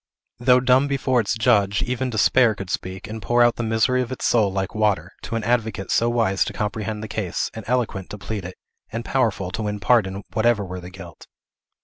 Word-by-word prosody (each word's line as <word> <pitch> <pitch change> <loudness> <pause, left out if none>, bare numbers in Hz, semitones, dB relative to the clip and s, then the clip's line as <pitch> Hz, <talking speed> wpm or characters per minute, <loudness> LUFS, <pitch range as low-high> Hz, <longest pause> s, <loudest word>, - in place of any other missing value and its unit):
Though 125 +1 +5
dumb 130 +2 +3
before 135 -2 +1
its 110 0 0
Judge, 105 -3 +2
even 125 +1 -2
despair 115 0 +3
could 95 -2 -7
speak, 95 +3 -4
and 110 0 -7
pour 120 +2 +3
out 120 -1 +3
the - - -2
misery 115 +3 +2
of 125 - -4
its 130 - -4
soul 110 -5 +3
like 95 0 -3
water, 105 -3 0
to - - -5
an 115 - -2
advocate 110 -4 -1
so 115 - +3
wise 115 -5 +2
to - - -5
comprehend 105 +1 -3
the - - -5
case, 100 -5 -3
and 110 - -7
eloquent 115 -6 -1
to 105 - -7
plead 100 0 -5
it, 90 +1 -8 0.4
and 115 +1 -4
powerful 110 -8 0
to 105 - -4
win 105 -1 -3
pardon 100 -2 +2
whatever 110 -2 +2
were 90 0 -6
the 90 - -9
guilt. 90 -2 -12
110 Hz, 215 wpm, -22 LUFS, 100-120 Hz, 0.4 s, Though